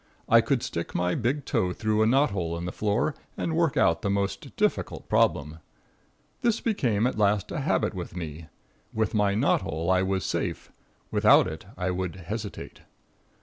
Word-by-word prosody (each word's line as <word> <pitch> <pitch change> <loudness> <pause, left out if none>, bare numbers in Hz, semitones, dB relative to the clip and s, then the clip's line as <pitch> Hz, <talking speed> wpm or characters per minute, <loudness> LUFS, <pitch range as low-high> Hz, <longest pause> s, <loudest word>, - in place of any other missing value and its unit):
I - - +6
could - - 0
stick - - -4
my 90 0 +1
big 130 +4 -1
toe 90 -1 0
through 110 +1 0
a 110 - +4
knot 135 +5 +3
hole 85 -4 -2
in 85 - -5
the 90 - -3
floor 105 +10 0 0.2
and 160 - -1
work 165 -3 +1
out 85 0 +3
the 100 - -1
most 100 0 -2
difficult - - -1
problem. 75 +2 +1 0.8
This 235 -2 +2
became 120 - +1
at 125 -3 -1
last 100 -1 +2
a - - -2
habit - - 0
with 90 - -6
me. 80 -1 -6 0.4
With 110 -2 -1
my 105 -2 +2
knot 110 - +2
hole 80 +4 -2
I 90 0 +4
was 95 0 -1
safe, - - -3 0.4
without - - +6
it - - -6
I 90 +1 -1
would 90 -1 -3
hesitate. 105 +4 -7
100 Hz, 180 wpm, -27 LUFS, 90-110 Hz, 0.8 s, I